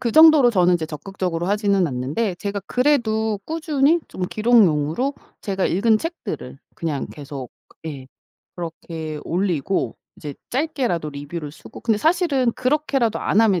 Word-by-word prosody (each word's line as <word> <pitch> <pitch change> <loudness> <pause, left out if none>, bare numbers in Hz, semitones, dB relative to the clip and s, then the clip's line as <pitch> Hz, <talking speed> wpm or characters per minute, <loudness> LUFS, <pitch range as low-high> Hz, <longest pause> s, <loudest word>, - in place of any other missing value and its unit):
그 235 -3 -1
정도로 310 -5 +8
저는 180 -4 +4
적극적으로 170 +2 -4
하지는 200 -2 +2
않는데 145 - -2
제가 200 +2 -3
그래도 220 -6 +1
꾸준히 310 0 +2
좀 185 - -7
기록용으로 215 - +3 0.3
제가 195 -2 -1
읽은 215 +5 +3
책들을 325 - -6 0.2
그냥 155 -5 -3
계속 140 -3 -8 0.4
예 140 -4 -6 0.5
그렇게 160 -2 -6
올리고 175 - -1 0.2
이제 145 -2 -7 0.2
짧게라도 250 - -1
리뷰를 145 +2 -6
쓰고 150 - -12
근데 225 -3 +1
사실은 300 - +2
그렇게라도 265 -3 0
안 205 - +2
하면 200 -6 +4
200 Hz, 320 characters per minute, -22 LUFS, 160-250 Hz, 0.5 s, 정도로